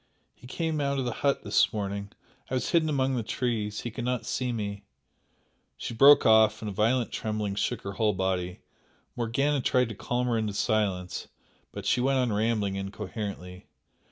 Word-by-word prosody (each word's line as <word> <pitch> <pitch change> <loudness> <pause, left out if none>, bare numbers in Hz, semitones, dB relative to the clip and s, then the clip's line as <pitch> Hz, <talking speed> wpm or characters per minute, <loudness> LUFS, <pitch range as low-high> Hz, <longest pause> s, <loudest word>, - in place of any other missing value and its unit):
and 125 - -15
he - - -9
came 160 -3 0
out 140 0 0
of 130 - -1
the 120 - -1
hut 140 -1 +1
this 105 - +3
morning 100 -1 -4 0.4
I 130 - -1
was 130 - -1
hidden 165 -2 +3
among 135 -2 +1
the 120 - 0
trees 110 -2 -2
he 120 - -5
could 120 - -5
not 125 0 -1
see 125 -1 -1
me 100 -3 -4 0.5
" - - -43
she - - -5
broke 140 +5 +7
off, 110 -1 +5
and 105 - -3
a - - -5
violent 115 +4 +1
trembling 105 -2 -2
shook 110 +3 -2
her 100 - -4
whole 105 +1 +1
body. 90 -1 -2 0.5
Morgana 135 +5 0
tried 125 -1 +2
to 110 - -6
calm 120 +5 -1
her 120 -2 +1
into 105 -2 -2
silence, 100 -5 -1 0.4
but - - -7
she 125 - +2
went 135 +1 +2
on 125 -4 +1
rambling 105 -2 0
incoherently. 95 -2 -6
110 Hz, 190 wpm, -28 LUFS, 100-125 Hz, 0.5 s, broke